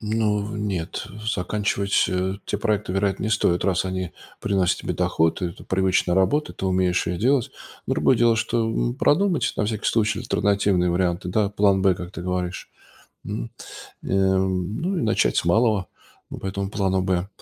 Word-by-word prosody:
Ну, 105 -1 0
нет, 100 -6 -3 0.3
заканчивать, 100 +1 0
э, 95 +1 -1
те 105 - -2
проекты, 105 -4 -1
вероятно, 95 0 0
не - - 0
стоит, 90 -5 +2
раз 95 -1 +1
они 95 -1 -3 0.3
приносят 95 -2 +1
тебе - - -3
доход. 80 +3 +1
Это 85 -2 -5
привычная 95 -2 +1
работа, 95 +11 +2
ты 95 - -4
умеешь 90 -1 +1
ее 90 - -1
делать. 125 +5 +2 0.4
Другое - - +3
дело, 115 -1 +4
что, 115 0 0
м, 120 +2 -1
продумать, 175 +6 +2
на - - +1
всякий 105 0 -2
случай, 110 -1 +1
альтернативные 100 -6 +1
варианты, 90 0 0
да 100 +2 +1
план 100 -1 +2
Б, 95 -2 +4
как 90 0 -7
ты 85 - -7
говоришь, 90 -1 -3 0.6
м. - - -5 0.5
Э, - - -7
ну 95 - 0
и - - -1
начать 110 - +2
с - - +2
малого 105 +1 +2 0.4
по - - -8
этому 95 0 -3
плану 95 -2 0
Б. 95 0 0
95 Hz, 165 wpm, -23 LUFS, 90-105 Hz, 0.6 s, дело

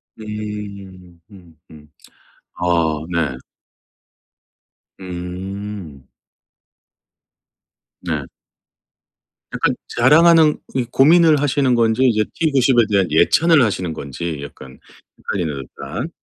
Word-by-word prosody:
음. 100 -4 -8
음 85 -5 -17
음. 75 -1 -16 0.7
아 90 - -5 0.5
네. 75 -6 -1 1.6
음. 90 -4 -7 1.9
네. 80 -6 -4 1.3
약간 - - 0 0.2
자랑하는 155 +4 +5
고 125 -2 -4
고민을 155 +1 +5
하시는 135 -2 +1
건지 115 0 +1
이제 110 -4 +3
T90에 135 -7 +2
대한 95 -3 +2
예찬을 155 - +4
하시는 95 -6 -2
건지 75 +3 -6
약간 65 -2 -12 0.4
헷갈리네요 80 -7 -3
일단. 75 - -7
100 Hz, 165 characters per minute, -19 LUFS, 85-130 Hz, 1.9 s, 자랑하는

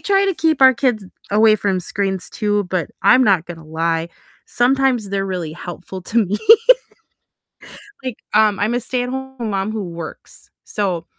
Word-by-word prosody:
try 395 0 +2
to 390 -2 0
keep 315 -3 +1
our 260 0 +8
kids 235 -4 -1 0.3
away 215 0 +5
from 195 -2 -1
screens 190 +1 -3
too, 205 -2 0
but 180 -5 -2
I'm 255 0 +5
not 190 -6 +3
gonna 165 -2 -9
lie, 165 +1 -1 0.4
sometimes 250 -3 +1
they're 195 0 -2
really 180 -5 -4
helpful 175 +2 -8
to 225 +3 +1
me, 205 +4 -2 1.7
like, 255 -3 -3 0.2
um, 215 -2 +4
I'm 215 +4 0
a 245 - 0
stay-at 250 0 -3
home 265 -3 -5
mom 195 +1 -2
who 215 - -3
works, 170 -2 -9
so 185 -5 -3
210 Hz, 160 wpm, -19 LUFS, 185-245 Hz, 1.7 s, our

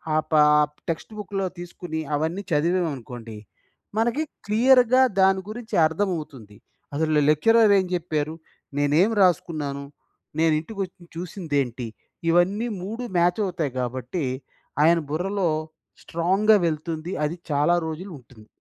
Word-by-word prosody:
ఆపాప్ 150 -1 +4 0.2
text 165 +6 -4
బుక్‌లో 195 -1 -3
తీసుకొని, 175 -2 -6 0.2
అవన్నీ 160 +7 -2
చదివామనుకోండి. 145 -9 -1 0.6
మనకి 240 +7 +1 0.2
క్లియర్‌గా 250 +3 +5 0.2
దాని 190 0 +4
గురించి 230 +1 -6
అర్థం 165 +6 0
అవుతుంది. 130 -10 -10 0.4
అసలు 155 0 +2
లెక్చరర్ 215 +8 +5
ఏం 190 - 0
జెప్పారు. 155 -3 -2 0.4
నేనేం 150 +9 +3
రాసుకున్నాను. 155 -6 +1 0.6
నేను 160 -1 +4
ఇంటికి 200 +6 -9
వచ్చి 180 0 -19
చూసిందేంటి. 145 - -3 0.4
ఇవన్నీ 185 +7 +2 0.2
3 225 +6 -5
మ్యాచ్ 175 +3 +3
అవుతాయి. 170 -7 -2
కాబట్టి 130 +6 -3 0.6
ఆయన 170 +2 +5
బుర్రలో 180 +3 0 0.5
స్ట్రాంగ్‌గా 190 +6 +3
వెళ్తుంది. 160 +1 -3
అది 155 +3 -2 0.2
చాలా 150 +4 +3
రోజులు 175 +5 -6
ఉంటుంది. 115 -3 -18
165 Hz, 115 wpm, -24 LUFS, 150-195 Hz, 0.6 s, క్లియర్‌గా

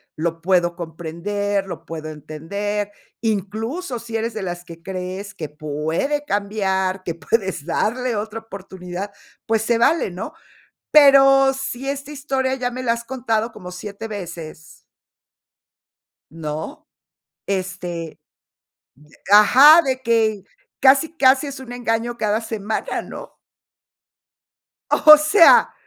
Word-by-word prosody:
lo 165 +1 -3
puedo 175 -1 +1
comprender, 190 +5 -3
lo 175 - -8
puedo 160 -1 -7
entender. 200 +8 -4 0.3
Incluso, 225 - -3
si 230 0 -8
eres 225 +1 -2
de 215 -3 -5
las 175 -1 -5
que 165 -1 -12
crees 190 +2 -6
que 155 -3 -6
puede 155 - -2
cambiar, 195 -4 -1
que 170 -3 -4
puedes 190 -3 -2
darle 240 +8 -1
otra 215 +2 -4
oportunidad, 190 -2 -8 0.3
pues 225 -1 +1
se 235 +1 +1
vale, 270 +3 +2
¿no?, 190 - -7 0.6
pero, 275 -2 +7
si 270 0 -4
esta 280 +1 -6
historia 270 -2 -2
ya 250 -2 -2
me 255 +1 -6
la 235 -2 +1
has 235 0 -4
contado 230 -2 -2
como 180 -5 -10
7 200 +4 -7
veces. 170 -6 -9 1.5
¿No?, 155 -1 -6 0.6
este, 180 -4 -4 0.9
de - - -21
ajá, 270 +10 +8
de 260 -3 -2
que 220 -4 +1 0.4
casi 280 +5 +4
casi 265 +2 +4
es 275 -1 -8
un 260 -2 -10
engaño 240 -1 -2
cada 215 -1 0
semana, 220 -1 -3
¿no? - - -10 1.5
O 305 0 +9
sea, 320 +4 +6
210 Hz, 125 wpm, -21 LUFS, 180-250 Hz, 1.5 s, O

